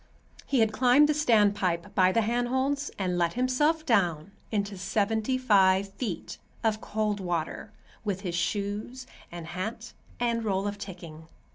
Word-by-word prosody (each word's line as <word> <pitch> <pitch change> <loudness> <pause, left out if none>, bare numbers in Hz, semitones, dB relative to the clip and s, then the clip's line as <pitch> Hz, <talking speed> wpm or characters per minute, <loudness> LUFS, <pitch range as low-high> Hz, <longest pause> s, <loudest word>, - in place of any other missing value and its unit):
He 270 -4 +2
had 220 -1 +3
climbed 255 +5 +5
the 305 - +2
standpipe 205 - +2
by 185 -1 +4
the 230 - +2
handholds 260 +5 0
and 180 -2 -1
let 170 -1 +1
himself 295 +6 +1
down 180 - +1 0.2
into 200 -2 -1
seventy 215 +6 0
five 195 -5 +4
feet 200 -4 -5 0.2
of 220 -1 +1
cold 210 -1 -1
water, 175 -4 -3 0.3
with 200 -3 -2
his 180 -4 -4
shoes 205 +9 -2 0.3
and 170 -1 -7
hat 220 +7 -5 0.3
and 235 -1 0
roll 195 -2 0
of 205 0 -4
ticking. 170 -5 -9
205 Hz, 145 wpm, -28 LUFS, 185-240 Hz, 0.3 s, climbed